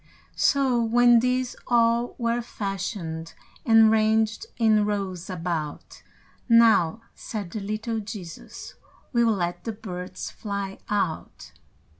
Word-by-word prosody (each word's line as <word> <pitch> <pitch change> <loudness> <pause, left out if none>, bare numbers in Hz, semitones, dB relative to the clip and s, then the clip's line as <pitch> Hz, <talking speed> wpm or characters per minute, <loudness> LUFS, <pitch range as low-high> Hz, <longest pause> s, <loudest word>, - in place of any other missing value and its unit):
So, 265 -4 +2
when 240 +1 +5
these 250 +1 0
all 235 0 +2
were 235 0 0
fashioned, 195 -7 -5 0.3
And 225 -1 +7
ranged 220 - +2
in 220 -2 +4
rows 195 -4 -3
about, 165 -4 -4 0.5
"Now," 230 -5 +5
said 205 -6 -6
the 215 - -4
little 215 +3 -3
Jesus, 200 -6 -9 0.4
"We'll 235 -1 +3
let 175 -1 -3
the 225 - -4
birds 185 -4 -7
fly 200 -2 -5
out." 195 -6 -3
215 Hz, 110 wpm, -25 LUFS, 185-230 Hz, 0.5 s, And